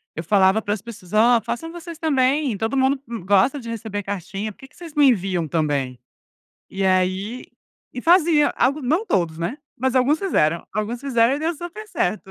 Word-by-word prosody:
eu 160 - -4
falava 195 +3 +3
para 205 -1 -1
as 205 - -5
pessoas: 210 -5 -11
"Ó, 230 +2 +5
façam 240 +9 -5
vocês 340 -1 -9
também. 275 -5 +1
Todo 225 +5 -2
mundo 265 +1 +2
m 230 -6 -6
gosta 200 +9 +3
de 235 - -8
receber 220 -3 -4
cartinha. 200 +2 -4
Por - - -21
que 265 - -12
que - - -28
vocês 340 -3 -11
me 290 -1 +6
enviam 185 -8 +1
também?". 145 -6 -1 0.7
E 195 0 -3
aí 185 +5 0 0.5
e 250 - -5
fazia 330 -3 +4
algo 280 +4 +1
não 320 - 0
todos, 170 -4 0
né. 170 - -3 0.2
Mas 260 +1 -1
alguns 265 +4 +3
fizeram. 170 - 0
Alguns 215 +3 -2
fizeram 255 -2 +2
e - - -4
deu 325 +2 -1
super 350 +7 -8
certo. 195 - -2
230 Hz, 195 wpm, -22 LUFS, 190-280 Hz, 0.7 s, me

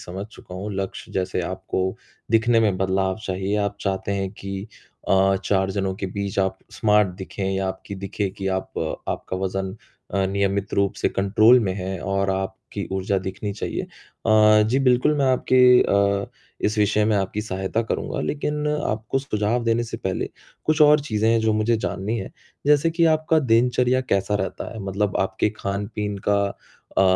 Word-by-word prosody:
समझ 95 +3 -6
चुका 110 -4 -13
हूँ, 95 +3 -5
लक्ष्य 95 0 -5
जैसे 90 -1 -1
आपको 95 +1 -2 0.3
दिखने 115 +1 +4
में 105 -4 +2
बदलाव 95 0 +1
चाहिए 95 +2 -1
आप 100 0 -1
चाहते 95 0 -2
हैं 95 -1 -2
कि 100 -1 -6 0.4
अ, 95 0 +4
4 95 -1 +1
जनों 95 -1 -1
के 95 - -4
बीच 100 +1 -4
आप 95 0 +1
स्मार्ट 105 -2 +3
दिखें 95 +1 -5
या 95 0 -1
आपकी 95 +1 -6
दिखे 100 +1 -3
कि 95 - -3
आप 95 0 -3 0.3
आपका 95 - -3
वज़न 95 +1 -3 0.4
अ, 100 -1 +2
नियमित 100 0 -1
रूप 100 -1 +1
से - - +1
कंट्रोल 110 +5 +5
में 95 -4 0
है 95 0 -4
और 100 0 0
आपकी 95 0 -4
ऊर्जा 95 +1 0
दिखनी 95 +2 -4
चाहिए 100 - -3
अ, - - -9 0.7
जी, 115 +5 +1
बिल्कुल 130 +2 +3
मैं 140 - +3
आपकी 125 0 +5
अ, 100 0 +2 0.4
इस 105 +1 +1
विषय 105 0 +3
में 110 -1 +2
आपकी 100 +1 -1
सहायता 95 +2 -2
करूँगा। 115 - -3
लेक़िन 150 - -2 0.2
आपको 110 +4 -1
सुझाव 115 -2 -1
देने 115 0 +2
से 115 - -6
पहले, 95 -5 -2 0.4
कुछ 155 0 +1
और 150 0 +7
चीज़ें 110 -6 0
हैं 115 0 +3
जो 110 0 +2
मुझे 110 +2 +2
जाननी 100 +1 -2
हैं, 95 - -6 0.4
जैसे 150 +2 +4
कि 165 +1 +2
आपका 155 +1 +2
दिनचर्या 125 0 +3
कैसा 105 -5 0
रहता 95 +2 -3
है 110 - -8
मतलब 100 +1 -1
आपके 95 +2 0
ख़ान-पीन 100 +1 -3
का 100 0 +3 0.6
अ - - +6
100 Hz, 175 wpm, -23 LUFS, 95-115 Hz, 0.7 s, और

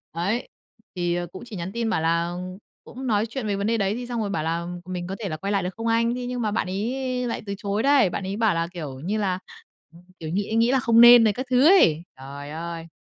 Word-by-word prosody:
Đấy. 200 +9 -1 0.5
Thì 175 -1 0
cũng 185 - -9
chỉ 225 -4 -9
nhắn 180 +2 -5
tin 230 0 -2
bảo 220 - 0
là 170 +1 0 0.5
cũng 260 +1 -8
nói 215 -2 +2
chuyện 230 0 -5
về 205 - 0
vấn 200 +2 -2
đề 230 0 +1
đấy 200 +1 0
thì 245 0 -5
xong 240 -2 -2
rồi 205 - -2
bảo 160 -6 -2
là 165 +1 -2 0.2
"Mình 180 -1 -5
có 190 - -4
thể 205 -4 -4
là 155 - -4
quay 195 +5 -3
lại 200 -3 +1
được 180 - -1
không 230 0 -3
anh?" 230 +1 +2
Thế 250 0 -4
nhưng 245 0 -3
mà 215 - 0
bạn 205 -2 -1
ấy 250 +5 -2
lại - - -3
từ 200 - -4
chối 200 +2 -2
đấy. 275 -8 +4
Bạn 190 - -4
ấy 195 +2 -4
bảo 220 -4 +3
là, 165 0 0
kiểu 145 -6 -6
như 195 +8 -2
là, 190 -3 -1 0.5
ừm, 170 - -16 0.2
kiểu, 160 - -6
nghĩ 200 +5 -2
nghĩ 230 +2 +3
là 265 - +3
không 230 -1 +5
nên 240 -1 +10
rồi 215 - +3
các 255 +5 -4
thứ 255 +2 +4
ấy. 170 - +5 0.2
Trời 140 +2 -8
ơi! 165 +1 -6
205 Hz, 265 wpm, -24 LUFS, 175-235 Hz, 0.5 s, nên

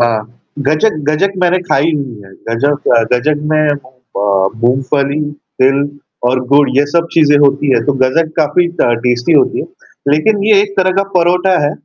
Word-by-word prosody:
हाँ, 115 -3 0 0.3
गचक 155 +8 +1
गजक 190 +6 +1
मैंने 180 +1 +2
खाई 145 +4 +2
हुई 135 -7 -5
है, 95 - -16 0.2
गजक 140 +5 -1
अ, 115 - +4
गजक 145 +5 +1
में 155 0 +2 0.2
मूँग 130 0 -20
अ, 100 -1 +1 0.2
मूँगफली, 140 +3 0 0.4
तिल 135 +2 +3 0.5
और 130 0 0
गुड 140 +1 +4
ये 140 - +4
सब 170 +3 0
चीज़ें 150 -3 +4
होती 145 0 +2
हैं, - - +1
तो 145 - +2
गजक 155 +5 0
काफ़ी 160 +2 +1
ट - - +3 0.2
टेस्टी 120 +5 +1
होती 150 - +2
है। - - -5 0.4
लेकिन 195 +8 +1
ये 210 -2 +4
एक 200 -1 -7
तरह 185 0 +3
का 195 - +3
परोठा 180 +1 +2
है। - - 0
145 Hz, 180 wpm, -13 LUFS, 130-165 Hz, 0.5 s, अ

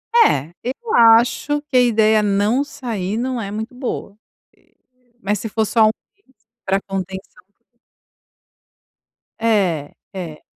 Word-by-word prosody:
É, 165 - +4
eu 290 - -4
acho 235 +6 +4
que 285 -3 -1
a - - +7
ideia 220 -2 +3
de 205 - +1
não 210 +7 +2
sair 220 -8 -4
não 250 0 -2
é 200 -1 -5
muito 220 +3 -5
boa. 235 -5 -5 1.0
Mas 205 +1 -1
se 225 - -5
for 220 +1 0
só 225 +2 +1
1 215 0 +4 0.2
vez, 365 - -33 0.3
pra 195 +1 +1
contenção. 190 -1 -7 2.0
É, 190 -10 +1 0.2
é. 170 -5 -7
220 Hz, 130 wpm, -19 LUFS, 195-245 Hz, 2.0 s, a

